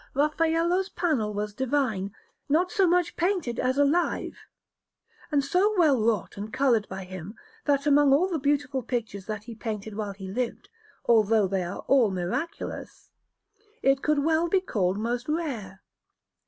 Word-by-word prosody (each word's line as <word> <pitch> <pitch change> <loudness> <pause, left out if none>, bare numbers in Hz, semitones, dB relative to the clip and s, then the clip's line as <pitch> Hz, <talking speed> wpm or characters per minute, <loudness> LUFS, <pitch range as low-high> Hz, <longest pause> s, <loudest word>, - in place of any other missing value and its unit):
Raffaello's 330 +5 +1
panel 280 - 0
was 210 0 -3
divine, 240 -6 -1 0.4
not 350 +5 +2
so 390 -4 +3
much 355 0 +2
painted 350 -9 -1
as 255 +1 0
alive, 290 +5 +1 1.0
and 285 -2 +2
so 385 +8 +2
well 295 -9 +4
wrought 220 -4 0
and 210 +2 -6
coloured 250 -5 +2
by 190 0 -6
him, 185 +2 -8 0.3
that 280 -1 +2
among 290 -1 +5
all 305 +7 +4
the 340 -4 -2
beautiful 280 -1 0
pictures 220 -5 -4
that 215 -1 -4
he 235 +1 -8
painted 220 -2 -5
while 205 -2 -3
he 190 -1 -9
lived, 235 +5 -3 0.4
although 220 -3 +4
they 190 0 -1
are 175 +3 -5
all 260 -6 +5
miraculous, 195 - -5 0.7
it 270 0 +3
could 300 -2 +1
well 325 +2 +2
be 385 - +3
called 195 - -1
most 240 +4 -2
rare. 245 - -3
260 Hz, 155 wpm, -27 LUFS, 210-305 Hz, 1.0 s, among